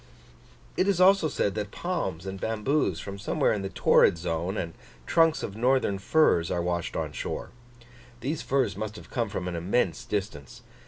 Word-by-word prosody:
It 185 Hz, -, +2 dB
is 195 Hz, -3 st, +2 dB
also 190 Hz, -2 st, +6 dB
said 100 Hz, -9 st, 0 dB
that 105 Hz, -2 st, -3 dB
palms 100 Hz, -, -3 dB
and 95 Hz, 0 st, -6 dB
bamboos 110 Hz, -, 0 dB
from 100 Hz, +1 st, -7 dB
somewhere 100 Hz, -, +1 dB
in 105 Hz, -, -2 dB
the 95 Hz, -, -4 dB
torrid 85 Hz, -, +4 dB
zone, 85 Hz, +3 st, -2 dB
and 85 Hz, -1 st, -3 dB, 0.3 s
trunks 165 Hz, -, +3 dB
of 100 Hz, -, -5 dB
northern 120 Hz, -4 st, +2 dB
firs, 95 Hz, -, +3 dB
are -, -, -1 dB
washed 85 Hz, -1 st, -2 dB
on -, -, -2 dB
shore: -, -, -5 dB, 0.7 s
these 145 Hz, +5 st, -2 dB
firs 130 Hz, -7 st, 0 dB
must 105 Hz, +1 st, -5 dB
have -, -, -12 dB
come 115 Hz, -4 st, -1 dB
from 90 Hz, -3 st, -4 dB
an 90 Hz, -, -3 dB
immense 90 Hz, +1 st, 0 dB
distance. 95 Hz, -, -5 dB
105 Hz, 175 wpm, -27 LUFS, 90-135 Hz, 0.7 s, also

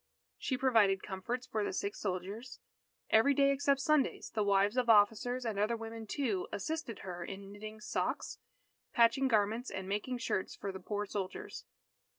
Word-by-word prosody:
She 260 Hz, -, -1 dB
provided 220 Hz, -7 st, +4 dB
comforts 235 Hz, +6 st, -4 dB
for 220 Hz, -4 st, -1 dB
the -, -, -1 dB
sick 200 Hz, +2 st, -2 dB
soldiers. 200 Hz, +6 st, -4 dB, 0.5 s
Every 275 Hz, +6 st, +5 dB
day 275 Hz, 0 st, +5 dB
except 275 Hz, 0 st, +2 dB
Sundays, 300 Hz, 0 st, +1 dB
the 215 Hz, -, 0 dB
wives 200 Hz, +1 st, +3 dB
of 250 Hz, -2 st, +1 dB
officers, 225 Hz, +4 st, +4 dB
and 215 Hz, -3 st, -1 dB
other 220 Hz, +3 st, +1 dB
women 225 Hz, 0 st, -7 dB
too, 220 Hz, -8 st, -1 dB
assisted 310 Hz, 0 st, -4 dB
her 175 Hz, -2 st, -5 dB
in 195 Hz, +2 st, -8 dB
knitting 215 Hz, +1 st, -8 dB
socks, -, -, -2 dB, 0.5 s
patching 235 Hz, +3 st, +4 dB
garments, 220 Hz, +1 st, +1 dB
and 190 Hz, 0 st, -5 dB
making 210 Hz, +6 st, -2 dB
shirts 230 Hz, -5 st, -2 dB
for 200 Hz, -, -4 dB
the 190 Hz, -, -7 dB
poor 205 Hz, +1 st, -3 dB
soldiers. 195 Hz, -2 st, -5 dB
220 Hz, 165 wpm, -33 LUFS, 200-250 Hz, 0.5 s, Every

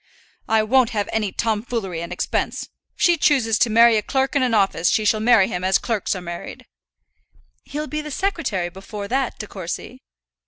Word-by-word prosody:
"I 220 Hz, -1 st, +3 dB
won't 245 Hz, +2 st, +3 dB
have 205 Hz, -, 0 dB
any 215 Hz, -3 st, 0 dB
tomfoolery 215 Hz, -6 st, -2 dB
and 170 Hz, +1 st, -6 dB
expense. 180 Hz, -, -2 dB
If -, -, -13 dB, 0.3 s
she 345 Hz, -1 st, +5 dB
chooses 240 Hz, -8 st, +2 dB
to 240 Hz, -, +3 dB
marry 230 Hz, +1 st, +6 dB
a -, -, +1 dB
clerk 265 Hz, +4 st, -1 dB
in 280 Hz, -, +3 dB
an 250 Hz, -3 st, +2 dB
office, 195 Hz, -4 st, +2 dB
she 215 Hz, -, +1 dB
shall 215 Hz, +1 st, +3 dB
marry 220 Hz, -3 st, +5 dB
him 180 Hz, -, -4 dB
as 190 Hz, +1 st, +3 dB
clerks 220 Hz, -4 st, -2 dB
are 185 Hz, -, -5 dB
married." 170 Hz, -1 st, -8 dB, 1.0 s
"He'll 300 Hz, +1 st, -4 dB
be 305 Hz, 0 st, -4 dB
the 300 Hz, -, -7 dB
secretary 295 Hz, -, -2 dB
before 200 Hz, +3 st, -8 dB
that, 265 Hz, +1 st, -1 dB
De -, -, -6 dB
Courcy." -, -, -7 dB
220 Hz, 190 wpm, -22 LUFS, 195-260 Hz, 1.0 s, marry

